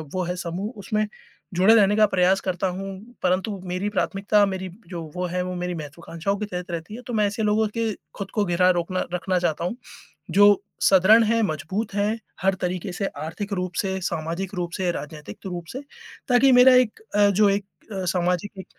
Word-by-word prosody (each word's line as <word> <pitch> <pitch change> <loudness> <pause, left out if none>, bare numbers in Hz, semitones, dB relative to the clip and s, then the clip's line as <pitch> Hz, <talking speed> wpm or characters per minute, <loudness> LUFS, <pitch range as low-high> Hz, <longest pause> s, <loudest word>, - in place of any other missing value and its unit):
वो 185 - 0
है 180 +1 -2
समूह 185 +5 -4
उसमें 215 +2 -1 0.5
जुड़े 190 +5 +6
रहने 205 -2 +5
का 215 0 +6
प्रयास 190 0 +3
करता 185 0 0
हूँ। 190 +2 -4 0.4
परंतु 185 +2 0
मेरी 185 +3 -2
प्राथमिकता 205 0 +2
मेरी 190 -1 -4 0.2
जो 175 -2 -5
वो 180 0 -1
है 180 +1 -2
वो 180 - -4
मेरी 180 0 -3
महत्वाकांक्षाओं 165 +5 -4
के 210 - -3
तहत 180 -2 -5
रहती 170 +5 -5
है, 245 - -8
तो 245 -1 -7
मैं 215 -2 +3
ऐसे 210 +2 -3
लोगों 215 +1 +2
के 225 -1 +1 0.3
ख़ुद 195 -1 -6
को 210 -2 +1
घिरा 180 0 +3
रोकना 180 +1 -1
रखना 180 +1 0
चाहता 170 -1 -1
हूँ, 180 - -2 0.6
जो 205 0 +6 0.2
सुदृढ़ 205 +4 +6
हैं, 230 +1 +2
मजबूत 190 +4 -2
हैं 210 +2 0 0.2
हर 195 0 +3
तरीक़े 180 +1 -4
से 195 +2 -2 0.2
आर्थिक 200 +6 -5
रूप 180 -1 -3
से, 190 -1 -2
सामाजिक 170 +3 -3
रूप 175 -1 -2
से, 185 -2 0
राजनीतिक 150 -7 -8
रूप 175 -2 -5
से 260 - -5 0.5
ताकि 255 +1 +5
मेरा 255 +1 +8
एक 250 - +3 0.2
अ, 205 -1 +6
जो 205 +1 +4
एक 200 0 0 0.4
सामाजिक 180 +2 -1
190 Hz, 190 wpm, -24 LUFS, 180-210 Hz, 0.6 s, मेरा